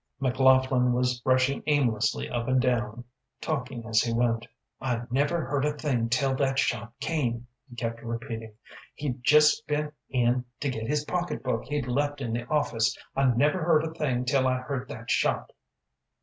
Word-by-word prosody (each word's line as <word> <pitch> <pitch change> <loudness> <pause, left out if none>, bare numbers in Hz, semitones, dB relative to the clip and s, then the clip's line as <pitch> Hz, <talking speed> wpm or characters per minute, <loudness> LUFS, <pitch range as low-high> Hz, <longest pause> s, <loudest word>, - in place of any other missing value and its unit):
McLaughlin 130 -1 +3
was 125 0 0
rushing 130 +1 +2
aimlessly 130 -8 +1
up 120 -1 -3
and 130 0 +3
down, 120 -2 0 0.4
talking 125 -6 -3
as 110 0 +3
he 115 - -1
went. 115 0 +1 0.3
"I 120 -3 -1
never 145 +5 +1
heard 135 +1 -1
a 150 0 +1
thing 125 -7 0
till 135 +2 +2
that 135 -1 +1
shot 115 -4 0
came," 125 -7 -1 0.2
he 120 - -12
kept 115 -1 -4
repeating. 115 -1 -6 0.4
"He'd 130 -4 -4
jest 150 +4 +5
been 150 0 -1 0.2
in 125 -1 +1
to 140 - -1
get 110 -2 -4
his 150 +1 0
pocketbook 160 -10 -2
he'd 145 -1 -2
left 145 +3 0
in 120 -4 -3
the 120 +1 -3
office. 120 -7 +1 0.2
I 135 - +2
never 145 +8 +2
heard 160 -2 +4
a 160 0 -4
thing 130 -6 -1
till 130 +1 +2
I 130 0 +2
heard 130 0 -4
that 115 0 -6
shot." - - +1
130 Hz, 170 wpm, -27 LUFS, 120-145 Hz, 0.4 s, jest